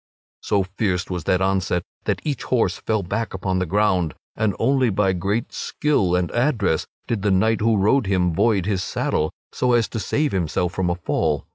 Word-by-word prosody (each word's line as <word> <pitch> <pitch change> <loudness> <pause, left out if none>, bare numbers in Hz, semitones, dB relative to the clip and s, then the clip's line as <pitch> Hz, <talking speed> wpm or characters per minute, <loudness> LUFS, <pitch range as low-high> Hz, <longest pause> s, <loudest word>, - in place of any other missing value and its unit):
So 100 -2 +1
fierce 95 -1 -2
was 90 -4 -3
that 90 0 +2
onset 95 -2 0 0.2
that - - -1
each 145 -5 -2
horse 125 -3 +1
fell 110 -2 -1
back 110 +4 -3
upon 95 0 -1
the 90 - -1
ground 95 -4 +1 0.2
and 110 -2 0
only 130 +1 +2
by 95 -1 +2
great 100 +5 -2
skill 105 -13 0
and 90 -1 0
address 120 - +1 0.2
did 115 -4 -2
the 105 - +1
knight 110 +3 +2
who 110 0 +3
rode 105 +4 +3
him 90 -3 +1
void 100 0 +2
his 100 -3 0
saddle, 80 -3 -1 0.2
so 125 -1 +1
as 120 -2 +3
to 115 - -4
save 145 +7 0
himself 90 0 -1
from 95 -2 0
a 85 - 0
fall. 80 -4 -1
95 Hz, 190 wpm, -22 LUFS, 90-115 Hz, 0.2 s, who